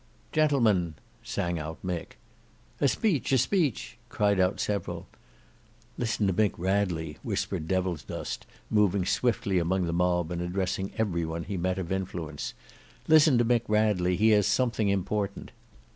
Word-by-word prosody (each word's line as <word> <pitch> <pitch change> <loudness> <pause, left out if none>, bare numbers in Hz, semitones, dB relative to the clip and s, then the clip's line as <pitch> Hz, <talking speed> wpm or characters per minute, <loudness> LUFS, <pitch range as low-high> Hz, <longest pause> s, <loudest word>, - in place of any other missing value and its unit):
"Gentlemen!" 115 - +2 0.3
sang 90 -7 -2
out 80 +1 -5
Mick. 90 -3 -4 0.6
"A 140 - +4
speech, 155 - +1
a - - +6
speech!" 140 - 0
cried 100 -3 +1
out 90 +1 +2
several. 105 -1 -3 0.9
"Listen 110 -3 -1
to 95 - +2
Mick 105 +2 +2
Radley," 90 -5 -1
whispered 80 - -2
Devilsdust 90 -5 -3 0.2
moving 100 -3 +3
swiftly 100 -4 +1
among 90 +2 0
the 85 - -2
mob 90 -1 +1
and 85 -1 -2
addressing 95 +2 -2
every 95 -7 0
one 80 +1 -3
he 100 - -5
met 90 +1 -1
of 95 -2 -4
influence. 90 -6 -4 0.5
"Listen 155 -4 +6
to 120 - +3
Mick 120 0 +3
Radley, 105 -4 +2
he 110 +4 +4
has 105 -2 +4
something 115 -5 +1
important." 100 +1 -2
95 Hz, 145 wpm, -28 LUFS, 90-110 Hz, 0.9 s, a